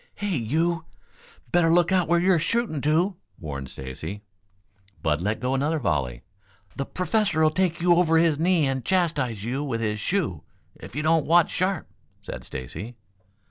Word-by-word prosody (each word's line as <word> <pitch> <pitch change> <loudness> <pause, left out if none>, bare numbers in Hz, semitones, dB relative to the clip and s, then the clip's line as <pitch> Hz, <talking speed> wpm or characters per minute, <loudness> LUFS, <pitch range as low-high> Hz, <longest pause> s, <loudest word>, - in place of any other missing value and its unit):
"Hey, 205 -3 -2
you! 160 +7 0 0.7
Better 170 -2 +4
look 175 +2 +4
out 185 -2 +3
where 170 +1 +3
you're 180 -1 +3
shooting 225 - 0
to!" 170 +6 +1 0.2
warned 70 -4 -6
Stacy. 80 +10 -7 0.8
Bud 75 -1 +1
let 105 +4 -1
go 130 +1 -1
another 145 +4 +1
volley. 65 - -1 0.5
"The 135 - -3
Professor'll 180 -4 +1
take 175 0 0
you 175 0 +4
over 170 -2 +4
his 160 -3 +3
knee 170 -2 +3
and 135 -2 -1
chastise 145 - 0
you 130 +5 -2
with 125 -6 -2
his 105 -2 -1
shoe, 155 - -1 0.3
if - - -12
you 150 - -2
don't 160 -2 +2
watch 170 +1 +4
sharp," 185 +1 -1 0.4
said - - -7
Stacy. 85 - -7
155 Hz, 160 wpm, -25 LUFS, 115-175 Hz, 0.8 s, Better